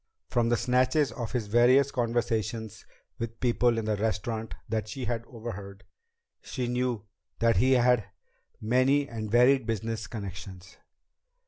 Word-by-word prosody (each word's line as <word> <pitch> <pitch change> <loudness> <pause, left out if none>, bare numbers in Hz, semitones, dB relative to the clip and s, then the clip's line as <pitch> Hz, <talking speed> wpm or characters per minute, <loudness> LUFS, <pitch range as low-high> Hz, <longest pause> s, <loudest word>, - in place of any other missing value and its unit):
From 120 -1 +1
the 120 - +3
snatches 130 +5 +2
of 120 -1 -5
his 120 -4 -1
various 125 +6 +4
conversations 115 -3 -2 0.3
with 115 0 -5
people 120 -1 +2
in 115 - -2
the 110 -1 +1
restaurant 110 +1 -2
that 110 -1 -2
she 125 +4 -5
had 115 0 -2
overheard, 100 -5 -8 0.6
she 125 -3 -4
knew 125 -3 -1 0.3
that 115 0 +3
he 130 +1 +4
had 125 -3 +4 0.5
many 130 +5 +2
and 110 -3 -5
varied 125 +2 +4
business 110 0 -3
connections. 95 -4 -8
115 Hz, 135 wpm, -28 LUFS, 110-125 Hz, 0.6 s, various